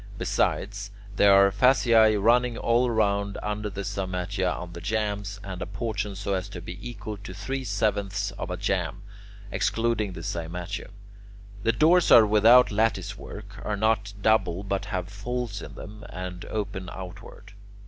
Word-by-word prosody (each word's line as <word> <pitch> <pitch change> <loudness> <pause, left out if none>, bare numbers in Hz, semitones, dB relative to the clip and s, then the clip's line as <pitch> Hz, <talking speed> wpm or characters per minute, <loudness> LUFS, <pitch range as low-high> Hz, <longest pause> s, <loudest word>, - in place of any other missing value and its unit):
Besides, 100 0 -1 0.3
there 100 0 +6
are 100 0 +6
fasciae 115 -1 +5
running 120 +3 +3
all 120 +1 +2
round 100 -3 +1
under 105 0 -2
the 100 0 -5
cymatia 95 0 -2
on 90 -1 -6
the 85 - -8
jambs, 100 0 -2
and 95 -2 -6
apportioned 105 0 -3
so 100 0 -2
as 95 +1 -2
to 90 - -7
be 90 +1 -8
equal 110 -3 -6
to 95 -2 -9
three 130 +7 -4
sevenths 100 -2 -1
of 100 - -6
a 90 - -3
jamb, 95 -1 -2 0.5
excluding 115 -4 0
the 85 - -7
cymatium. 90 +5 -5 0.7
The 115 - +3
doors 165 +7 +4
are 115 - +9
without 110 +4 +6
lattice 110 +2 0
work, 100 0 -10
are 105 -1 -2
not 105 -1 +1
double 100 -4 +2
but 100 0 -2
have 95 -4 -3
folds 105 +2 -4
in - - -9
them, 105 0 -10
and 90 -1 -6
open 100 -4 -4
outward. 95 +2 -10
100 Hz, 155 wpm, -26 LUFS, 95-110 Hz, 0.7 s, are